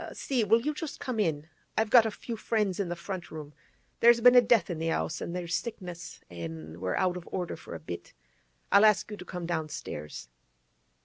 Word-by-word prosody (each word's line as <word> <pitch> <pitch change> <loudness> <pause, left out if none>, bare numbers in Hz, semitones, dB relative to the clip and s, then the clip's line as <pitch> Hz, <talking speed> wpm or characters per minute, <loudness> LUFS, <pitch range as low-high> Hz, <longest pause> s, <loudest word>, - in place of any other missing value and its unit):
'See, 255 -5 0
will 225 +3 +4
you 300 +2 0
just 300 0 -6
come 250 -4 -3
in? 155 -6 0 0.3
I've 220 0 +1
got 235 -3 +7
a - - 0
few 230 +2 -6
friends 210 -4 0
in 195 -3 -1
the 175 - -2
front 175 -1 -6
room; 150 -2 -8 0.5
there's 235 0 +7
been 245 +1 +8
a 250 - +9
death 230 -6 +3
in 165 - -4
the 165 0 -1
'ouse, 80 - -1
an' 170 - -4
there's 175 -1 -4
sickness, 175 -5 -5
an' 80 -2 -7
we're 90 0 -1
out 180 -1 +1
of 175 - -10
order 180 -2 -2 0.2
a - - -6
bit, 85 +3 -8 0.6
I'll 200 - +7
ask 215 0 +4
you 210 - -5
to 180 - -9
come 180 -1 -5
downstairs. 155 - -5
180 Hz, 205 wpm, -29 LUFS, 155-220 Hz, 0.6 s, a